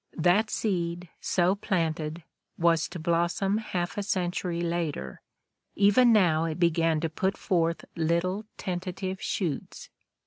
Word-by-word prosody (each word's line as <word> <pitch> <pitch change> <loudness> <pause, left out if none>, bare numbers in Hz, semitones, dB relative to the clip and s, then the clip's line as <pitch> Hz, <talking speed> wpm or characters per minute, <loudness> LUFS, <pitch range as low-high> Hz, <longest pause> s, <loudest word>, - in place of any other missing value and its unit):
That 180 +6 +3
seed, 175 -5 -2
so 180 +1 +2
planted, 165 -4 -2 0.3
was 165 -2 +3
to 175 - -8
blossom 175 +5 +1
half 180 -3 -3
a - - 0
century 180 -3 -1
later: 165 - -3 0.5
even 205 +5 +5
now 170 -7 +4
it 160 0 -3
began 165 -2 +2
to 165 - +1
put 190 +5 -1
forth 170 -3 0
little 170 +5 0
tentative 185 0 -4
shoots. 165 -8 -3
175 Hz, 125 wpm, -28 LUFS, 165-190 Hz, 0.5 s, even